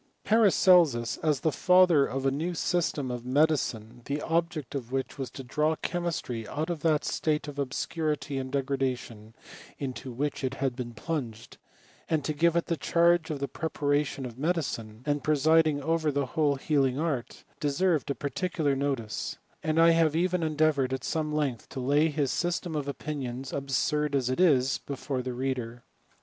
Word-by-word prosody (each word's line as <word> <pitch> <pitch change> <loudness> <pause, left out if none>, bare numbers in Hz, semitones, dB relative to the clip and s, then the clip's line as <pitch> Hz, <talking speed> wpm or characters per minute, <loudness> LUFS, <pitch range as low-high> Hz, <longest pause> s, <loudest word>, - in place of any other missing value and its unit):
'Paracelsus, 180 - +4
as 150 -4 0
the 160 - +2
founder 180 -3 +5
of 135 +1 -3
a 135 - +3
new 165 +6 -2
system 160 -7 0
of 120 -1 -5
medicine, 125 -5 0
the 140 +1 -2
object 165 -5 -1
of 125 -4 -5
which 135 +1 -3
was 130 -3 -3
to 135 - -9
draw» 150 +5 +1
chemistry 160 - -3
out 155 +4 -3
of 170 - -3
that 155 -1 +1
state 150 -1 -1
of 145 -1 -7
obscurity 145 0 -2
and 130 0 -5
degradation 130 -5 -2 0.4
into 130 -1 -5
which 140 +3 -3
it 130 0 -1
had 135 -2 -1
been 120 -2 -6
plunged, 115 -5 -5 0.5
and 155 -3 0
to 155 - -1
give 165 +3 +2
it 170 - +1
the 165 - -1
charge 170 0 +3
of 155 - -2
the 140 - -2
preparation 145 -3 -1
of 120 0 -8
medicine, 135 -9 -2
and 145 -1 0
presiding 155 0 +3
over 160 0 +1
the 140 0 0
whole 145 +2 +1
healing 135 -2 +1
art, 150 -6 -3 0.2
deserved 150 +2 +1
a 140 - 0
particular 150 0 -1
notice; 135 -6 -2 0.2
and 155 0 0
I 165 0 +7
have 165 -2 +3
even 180 +1 +1
endeavoured, 155 -4 +1
at 130 - -3
some 155 -2 -1
length, 145 -6 -2
to - - -6
lay 145 +5 +3
his 145 -3 0
system 175 -1 -1
of 145 -2 -2
opinions, 135 -3 -5
absurd 140 +2 0
as 130 -2 +1
it 130 - -2
is, 135 -7 +4
before 135 -1 -4
the 125 0 -4
reader. 125 -2 -3
145 Hz, 170 wpm, -28 LUFS, 130-160 Hz, 0.5 s, I